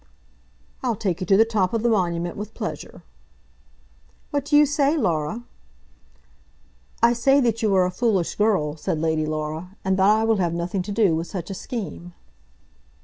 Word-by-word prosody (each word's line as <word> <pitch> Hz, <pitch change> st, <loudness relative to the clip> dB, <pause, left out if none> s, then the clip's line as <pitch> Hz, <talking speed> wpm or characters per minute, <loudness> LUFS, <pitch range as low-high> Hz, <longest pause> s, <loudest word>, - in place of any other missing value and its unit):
"I'll 245 Hz, -3 st, 0 dB
take 190 Hz, -3 st, -2 dB
you 185 Hz, -, -3 dB
to 195 Hz, -, +5 dB
the 225 Hz, -, +6 dB
top 215 Hz, -3 st, 0 dB
of 225 Hz, -, -1 dB
the 240 Hz, -, +3 dB
Monument 175 Hz, -5 st, 0 dB
with 210 Hz, +1 st, -7 dB
pleasure." -, -, -6 dB, 1.3 s
"What 285 Hz, -1 st, -1 dB
do 295 Hz, 0 st, +3 dB
you 300 Hz, -, +7 dB
say, 290 Hz, +2 st, +1 dB
Laura?" 175 Hz, -, -1 dB, 1.6 s
"I 235 Hz, 0 st, +6 dB
say 270 Hz, +4 st, +3 dB
that 230 Hz, -2 st, 0 dB
you 210 Hz, -3 st, +2 dB
are 185 Hz, -1 st, +4 dB
a 180 Hz, -, -1 dB
foolish 195 Hz, -4 st, 0 dB
girl," 190 Hz, -9 st, +1 dB
said 155 Hz, -, -2 dB
Lady 160 Hz, -1 st, 0 dB
Laura, 155 Hz, +4 st, -4 dB
"and 190 Hz, 0 st, +1 dB
that 190 Hz, +1 st, +4 dB
I 215 Hz, +1 st, +3 dB
will 225 Hz, -1 st, +2 dB
have 170 Hz, -3 st, 0 dB
nothing 175 Hz, +3 st, -2 dB
to 195 Hz, +3 st, -6 dB
do 200 Hz, -6 st, +3 dB
with 165 Hz, +2 st, -3 dB
such 185 Hz, -1 st, -6 dB
a -, -, -3 dB
scheme." 190 Hz, -4 st, -6 dB
195 Hz, 180 wpm, -23 LUFS, 170-230 Hz, 1.6 s, you